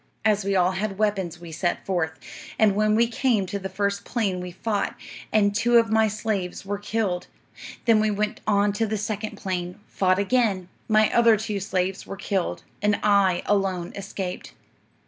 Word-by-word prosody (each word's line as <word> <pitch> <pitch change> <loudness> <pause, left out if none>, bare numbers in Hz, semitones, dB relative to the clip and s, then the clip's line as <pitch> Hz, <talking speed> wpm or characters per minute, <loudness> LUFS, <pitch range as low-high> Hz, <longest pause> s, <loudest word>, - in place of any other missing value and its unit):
"'As 210 -2 +3
we 195 0 0
all 180 0 +3
had 195 +1 -3
weapons, 195 -5 -1
we 170 -1 -10
set 175 +2 -2
forth; 175 -4 0 0.4
and 215 -2 +4
when 215 +1 +2
we 230 +2 +4
came 230 -3 +1
to 200 +2 -4
the 190 0 -5
first 200 +1 -1
plain 200 -7 -1
we 180 - -5
fought, 205 +3 -2 0.4
and 205 -2 +3
two 235 +3 +4
of 230 -2 +3
my 220 0 +4
slaves 205 -4 -3
were 200 +1 -3
killed. 205 -4 -2 0.6
Then 225 -3 +5
we 215 0 +2
went 210 +1 -2
on 205 -1 +3
to 220 +2 0
the 215 +1 -1
second 215 +1 -4
plain, 180 0 -4
fought 185 -1 +1
again; 200 -3 +1 0.2
my 215 -1 +3
other 235 -2 +5
two 210 -1 -3
slaves 190 0 -2
were 195 - -6
killed, 190 -2 -2 0.2
and 205 0 +2
I 200 -4 +3
alone 190 -4 0
escaped. 195 -2 -5
200 Hz, 180 wpm, -25 LUFS, 190-215 Hz, 0.6 s, Then